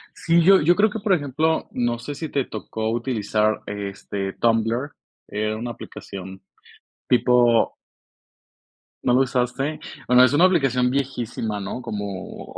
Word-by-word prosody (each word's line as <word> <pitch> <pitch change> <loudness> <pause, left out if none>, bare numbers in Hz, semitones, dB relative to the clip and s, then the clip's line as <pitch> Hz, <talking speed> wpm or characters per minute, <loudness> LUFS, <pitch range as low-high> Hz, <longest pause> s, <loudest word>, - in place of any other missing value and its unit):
Sí, 170 0 +2
yo 195 +2 +6
yo 170 +4 +4
creo 215 +3 +4
que, 225 - -5
por 200 -2 +1
ejemplo, 155 0 0
no 120 -1 -1
sé 145 +5 -6
si 155 +1 -5
te 140 -3 -1
tocó 110 0 -4
utilizar, 110 -3 0
este, 100 -1 -5
Tumblr, 115 +4 0 0.4
era 110 +1 -2
una 120 +2 -4
aplicación 95 -3 -9 0.7
tipo 120 -1 +3 1.3
¿no 125 - +2
lo 125 - +5
usaste? 135 +3 -1 0.3
Bueno, 125 0 +6
es 130 - +5
una 160 +5 +5
aplicación 135 -9 +2
viejísima, 120 -5 -2
¿no? 100 +6 -5
Como 100 -4 -6
125 Hz, 140 wpm, -23 LUFS, 110-140 Hz, 1.3 s, yo